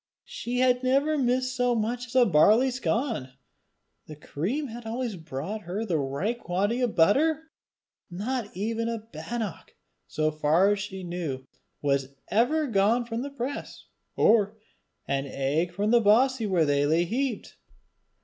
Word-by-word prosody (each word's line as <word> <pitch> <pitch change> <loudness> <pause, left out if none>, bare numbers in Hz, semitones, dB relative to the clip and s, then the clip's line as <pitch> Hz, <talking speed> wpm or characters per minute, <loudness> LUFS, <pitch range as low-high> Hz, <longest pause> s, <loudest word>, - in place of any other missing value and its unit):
She 245 +1 -4
had 250 -1 +3
never 275 +4 +2
missed 255 -1 0
so 245 -1 +2
much 240 +3 -2
as 240 - -12
a 250 -2 +6
barley 215 +8 +5
scon! 230 - -2 0.7
The 155 - -9
cream 215 - -3
had 235 +2 -8
always 235 -1 -3
brought 165 +6 -5
her 195 +5 -4
the 170 -7 0
right 145 - -2
quantity 205 +6 -1
of 245 -3 0
butter! 310 - +3 0.6
Not 215 +5 -3
even 230 +3 -1
a 230 - -2
bannock, 225 -2 -6 0.3
so 155 0 0
far 155 +6 +3
as 205 - 0
she 190 -1 -6
knew, 165 -7 -4 0.4
was 140 -1 0
ever 295 +8 +2
gone 225 +1 +2
from 230 0 -4
the 280 - -4
press, 280 0 -6 0.3
or 215 -1 +3 0.5
an 140 0 -1
egg 145 +6 -1
from 205 +4 -1
the 240 -1 +5
bossie 230 +2 +3
where 175 -4 +3
they 145 0 +2
lay 160 +3 +3
heaped! 245 +3 -3
220 Hz, 150 wpm, -27 LUFS, 170-245 Hz, 0.7 s, a